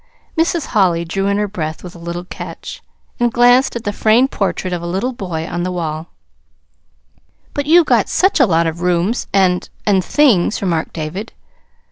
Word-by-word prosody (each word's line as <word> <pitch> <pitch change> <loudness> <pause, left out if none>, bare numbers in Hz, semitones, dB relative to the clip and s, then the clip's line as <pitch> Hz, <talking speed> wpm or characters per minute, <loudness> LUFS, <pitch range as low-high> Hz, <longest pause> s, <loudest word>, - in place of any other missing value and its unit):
Mrs. 330 -1 +1
Holly 175 -5 +2
drew 195 +4 -2
in 200 0 +1
her 210 0 0
breath 160 -6 -5
with 180 -1 -9
a - - -11
little 170 +1 -5
catch, 180 - -8 0.4
and 240 -1 +2
glanced 245 +3 +4
at 235 - -4
the 205 - -2
framed 230 +6 +3
portrait 190 -2 -2
of 175 - -3
a 170 - -5
little 195 +9 -2
boy 175 -8 -4
on 175 - -3
the 180 +1 -2
wall. 160 -2 -4 1.5
"But 285 0 -3
you've 335 +1 +6
got - - +2
such 380 -1 +2
a 270 - +5
lot 165 -2 +2
of 165 +1 -3
rooms 180 +6 0
and 185 -2 +2 0.2
and 195 -3 +3
things," 230 -10 +3
remarked 170 -5 -1
David. 170 +7 -5
190 Hz, 180 wpm, -17 LUFS, 170-235 Hz, 1.5 s, you've